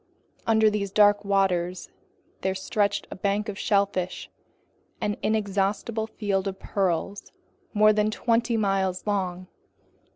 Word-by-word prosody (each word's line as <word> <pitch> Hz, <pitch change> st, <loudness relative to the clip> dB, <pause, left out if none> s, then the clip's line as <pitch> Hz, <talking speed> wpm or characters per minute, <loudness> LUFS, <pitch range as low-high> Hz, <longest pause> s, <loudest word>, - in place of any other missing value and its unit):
Under 220 Hz, -1 st, +4 dB
these 200 Hz, -1 st, -2 dB
dark 205 Hz, +1 st, +4 dB
waters 185 Hz, -3 st, 0 dB, 0.5 s
there 190 Hz, 0 st, -1 dB
stretched 205 Hz, +1 st, -1 dB
the -, -, -5 dB
bank 200 Hz, +3 st, -1 dB
of 205 Hz, -1 st, -5 dB
shellfish, 200 Hz, -3 st, 0 dB, 0.7 s
an 205 Hz, -, -1 dB
inexhaustible 210 Hz, +1 st, -1 dB
field 200 Hz, -3 st, -2 dB
of 190 Hz, -1 st, -4 dB
pearls 195 Hz, 0 st, -2 dB, 0.4 s
more 215 Hz, +1 st, +6 dB
than 210 Hz, 0 st, +2 dB
twenty 230 Hz, +1 st, +1 dB
miles 195 Hz, -3 st, 0 dB
long. 185 Hz, -3 st, -2 dB
200 Hz, 120 wpm, -26 LUFS, 190-210 Hz, 0.7 s, more